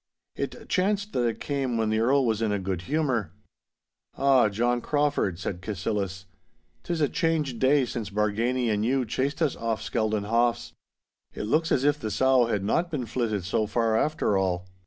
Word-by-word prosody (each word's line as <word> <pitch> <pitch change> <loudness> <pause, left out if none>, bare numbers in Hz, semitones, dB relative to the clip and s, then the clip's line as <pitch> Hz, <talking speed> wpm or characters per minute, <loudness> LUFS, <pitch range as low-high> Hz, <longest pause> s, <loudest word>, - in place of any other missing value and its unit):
It - - -5
chanced 200 +2 0
that 120 -2 +1
it 115 - -3
came 135 -4 -2
when 110 -1 0
the 110 - +1
Earl 130 +4 +3
was 110 -2 0
in 110 -2 +1
a 105 - +1
good 95 -2 -3
humour. 130 - 0 0.8
'Ah, 135 -5 +4
John 120 +4 0
Crauford,' 145 - 0
said 90 0 -5
Cassillis, 95 -1 -3 0.6
''tis 170 -2 -2
a 145 - +4
changed 150 -6 -1
day 135 +1 +4
since 115 -4 -5
Bargany 110 +4 0
and 105 0 0
you 130 +2 +1
chased 135 +8 -1
us 150 - +1
off 115 -2 -2
Skeldon 110 -2 -1
Haughs. 120 +2 +1 0.6
It - - -4
looks 155 +10 +1
as 130 - +2
if 145 +1 +2
the 110 - -3
sow 130 +2 +3
had 105 -4 -1
not 170 - +1
been 145 -7 -3
flitted 110 -4 -2
so 105 +2 0
far 115 +1 +1
after 150 -4 +1
all. 90 -2 -1
120 Hz, 180 wpm, -26 LUFS, 105-140 Hz, 0.8 s, Ah